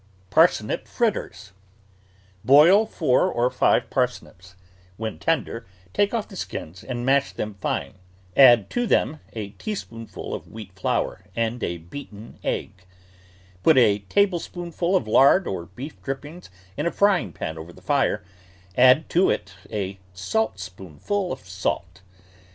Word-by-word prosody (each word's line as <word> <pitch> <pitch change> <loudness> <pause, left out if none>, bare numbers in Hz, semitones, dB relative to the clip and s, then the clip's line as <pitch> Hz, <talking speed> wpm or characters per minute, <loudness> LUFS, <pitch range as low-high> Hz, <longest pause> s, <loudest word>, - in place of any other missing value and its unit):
PARSNIP 160 -10 +3
FRITTERS 105 - -2 0.9
Boil 160 - +7
four 140 -11 +2
or 120 +1 +1
five - - +2
parsnips; 90 +1 -3 0.4
when 110 0 -5
tender, 135 -9 -1 0.3
take 205 0 +2
off 230 -3 -2
the 195 - -12
skins 90 - -6
and 120 -1 -4
mash 140 +1 +3
them 105 0 -4
fine; - - -2 0.4
add 120 -6 +7
to 245 -1 0
them 155 - +1
a 105 -3 -5
tea 155 - -5
spoonful 115 - -7
of - - -6
wheat 105 -3 -10
flour 90 0 -2
and 115 +1 -1
a 85 - -2
beaten 105 - -11
egg; 95 -2 -4 0.8
put 160 - +5
a 105 -5 +5
tablespoonful 175 -2 0
of 120 - +1
lard 140 - +5
or 85 -3 -4
beef 135 +10 -9
drippings 145 +6 -7 0.3
in 150 +4 -1
a - - 0
frying 195 - +2
pan 80 -1 -5
over 80 +2 -9
the - - -16
fire, 135 -8 +1 0.5
add 130 +5 +6
to 180 +3 +3
it 95 +3 -2 0.2
a 100 -2 -3 0.2
saltspoonful 95 - -3
of 90 - -7
salt. 95 +2 -3
120 Hz, 140 wpm, -24 LUFS, 95-165 Hz, 0.9 s, Boil